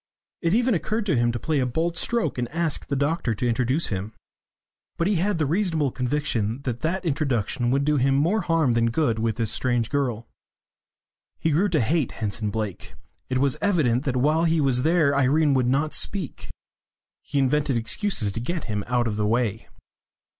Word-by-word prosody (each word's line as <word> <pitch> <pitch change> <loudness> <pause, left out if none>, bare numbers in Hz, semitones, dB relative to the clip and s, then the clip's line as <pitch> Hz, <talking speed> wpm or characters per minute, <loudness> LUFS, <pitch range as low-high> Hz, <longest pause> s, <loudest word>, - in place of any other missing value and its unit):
It 170 +4 +2
even 245 +1 +2
occurred 215 +4 -1
to 185 - +1
him 120 0 +2
to 120 - -3
play 155 +4 -1
a 130 - +1
bold 165 +7 -1
stroke 185 - -1
and 120 -1 -2
ask 165 -2 0
the 140 - -1
doctor 140 -4 0
to 125 - -1
introduce 125 +6 +1
him. 100 +2 -4 0.8
But 170 - 0
he 200 0 +2
had 195 +2 0
the 155 - +1
reasonable 160 -3 0
conviction 125 -3 -2
that 120 -3 -3
that 180 +4 -2
introduction 125 -6 0
would 140 +2 +1
do 150 0 +2
him 135 +1 +2
more 170 +10 +2
harm 160 -7 +2
than 115 0 +2
good 115 -3 0
with 110 -1 0
this 115 -3 -1
strange 120 -3 -1
girl. 125 -5 -1 1.1
He 160 - 0
grew 180 +8 +2
to 160 -6 +2
hate 145 +3 0
Henson 105 0 -3
Blake; 105 -3 -5 0.3
it 130 - 0
was 135 0 +1
evident 150 - +2
that 130 -3 -1
while 155 +6 +2
he 165 0 +2
was 135 -4 +2
there 155 -1 +3
Irene 140 +2 +3
would 130 -2 +2
not 145 +4 +1
speak. 190 -9 -3 0.7
He - - -4
invented 140 -1 +2
excuses 115 - 0
to 105 - -4
get 170 +6 -3
him 105 -3 -3
out 120 0 +1
of 105 -2 -3
the 105 -1 0
way. 115 -1 -1
140 Hz, 190 wpm, -24 LUFS, 120-160 Hz, 1.1 s, there